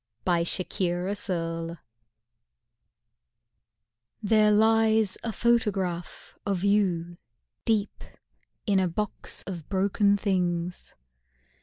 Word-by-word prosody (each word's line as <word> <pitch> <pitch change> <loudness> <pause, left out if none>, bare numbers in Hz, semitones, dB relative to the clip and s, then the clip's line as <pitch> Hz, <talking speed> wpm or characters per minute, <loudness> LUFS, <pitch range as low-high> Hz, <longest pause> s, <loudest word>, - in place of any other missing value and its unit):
THE 175 -2 +2
SENTIMENTALIST 175 -2 -2 2.4
There 215 0 +4
lies 220 -1 +3
a 230 - -2
photograph 200 -7 -1
of 195 -3 -1
you 180 -4 +1 0.5
Deep 215 -2 0 0.6
in 200 -3 +3
a 185 - +2
box 210 +4 -4
of 175 -5 -7
broken 200 +1 +2
things. 180 -3 -2
195 Hz, 75 wpm, -27 LUFS, 175-210 Hz, 2.4 s, There